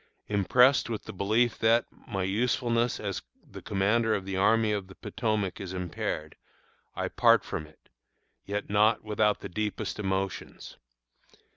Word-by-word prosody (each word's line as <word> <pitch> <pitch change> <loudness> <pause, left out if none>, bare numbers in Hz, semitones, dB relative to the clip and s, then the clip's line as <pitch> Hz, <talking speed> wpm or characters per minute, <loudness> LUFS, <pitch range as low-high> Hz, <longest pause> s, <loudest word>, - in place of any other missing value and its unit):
Impressed 125 +7 +4
with 110 -2 -4
the - - -8
belief 110 +5 +1
that, 115 +1 +4 0.2
my 95 -1 -2
usefulness 115 +3 0
as 100 -3 -3 0.3
the - - -10
commander 105 +3 +1
of 95 -2 -4
the 95 0 -4
Army 110 +3 +3
of 100 -3 -2
the 95 - -14
Potomac 110 -4 -2
is 95 -1 -6
impaired, 85 -4 -4 0.6
I - - -2
part - - +4
from 75 - -5
it, 75 - -24 0.6
yet 105 +1 -4
not 105 +2 +3
without 105 -1 +1
the - - -5
deepest 105 +3 -3
emotions. 95 -1 -4
105 Hz, 145 wpm, -28 LUFS, 95-115 Hz, 0.6 s, Impressed